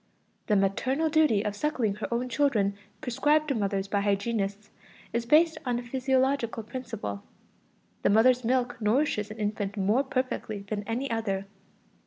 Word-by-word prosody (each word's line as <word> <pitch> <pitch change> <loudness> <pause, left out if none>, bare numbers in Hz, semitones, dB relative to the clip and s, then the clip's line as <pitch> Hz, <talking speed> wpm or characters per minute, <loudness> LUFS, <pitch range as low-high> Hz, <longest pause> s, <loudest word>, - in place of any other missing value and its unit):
The 210 - +3
maternal 255 +11 +1
duty 295 -10 +3
of 205 -1 -2
suckling 240 -4 0
her 215 - -5
own 240 +2 0
children 230 -8 +1 0.3
prescribed 300 +5 +2
to - - +2
mothers 200 -3 -1
by 200 0 0
hygienists 205 0 -1 0.4
is 235 0 -1
based 320 +4 +4
on 245 -2 0
a 240 - -4
physiological 260 -1 0
principle: 225 - -5 0.8
the - - +2
mother's 245 +4 +5
milk 245 0 0
nourishes 215 -1 +1
an 215 - -8
infant 210 -1 -2
more 210 +7 +2
perfectly 255 -6 -3
than 205 0 -2
any 250 +4 -2
other. 200 -4 -1
230 Hz, 150 wpm, -28 LUFS, 205-260 Hz, 0.8 s, mother's